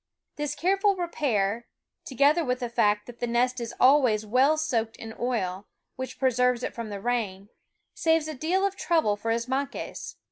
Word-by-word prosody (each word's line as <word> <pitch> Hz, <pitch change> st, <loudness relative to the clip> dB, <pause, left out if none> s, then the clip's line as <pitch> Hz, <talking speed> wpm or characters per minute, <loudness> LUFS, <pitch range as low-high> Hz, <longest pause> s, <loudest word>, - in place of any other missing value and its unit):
This 295 Hz, -1 st, -3 dB
careful 390 Hz, +4 st, +2 dB
repair, 235 Hz, -, -1 dB, 0.4 s
together 285 Hz, +5 st, +3 dB
with 250 Hz, -3 st, -1 dB
the 245 Hz, -, -2 dB
fact 210 Hz, -3 st, +2 dB
that 240 Hz, -1 st, -12 dB
the 240 Hz, -, -1 dB
nest 245 Hz, +2 st, +1 dB
is 235 Hz, -1 st, -5 dB
always 255 Hz, -6 st, +4 dB
well 260 Hz, +8 st, +3 dB
soaked 230 Hz, -8 st, -1 dB
in 225 Hz, 0 st, -8 dB
oil, 205 Hz, -6 st, -2 dB, 0.3 s
which 260 Hz, 0 st, -6 dB
pre 260 Hz, -1 st, +2 dB
serves 250 Hz, 0 st, +1 dB
it -, -, -3 dB
from 230 Hz, -2 st, -6 dB
the 200 Hz, -1 st, -5 dB
rain, 205 Hz, -4 st, -2 dB, 0.4 s
saves 320 Hz, -1 st, +1 dB
a 310 Hz, -, -4 dB
deal 340 Hz, +8 st, 0 dB
of 395 Hz, -1 st, -1 dB
trouble 320 Hz, -, +1 dB
for 215 Hz, +2 st, -5 dB
Ismaques. 255 Hz, +5 st, -3 dB
250 Hz, 175 wpm, -27 LUFS, 225-295 Hz, 0.4 s, always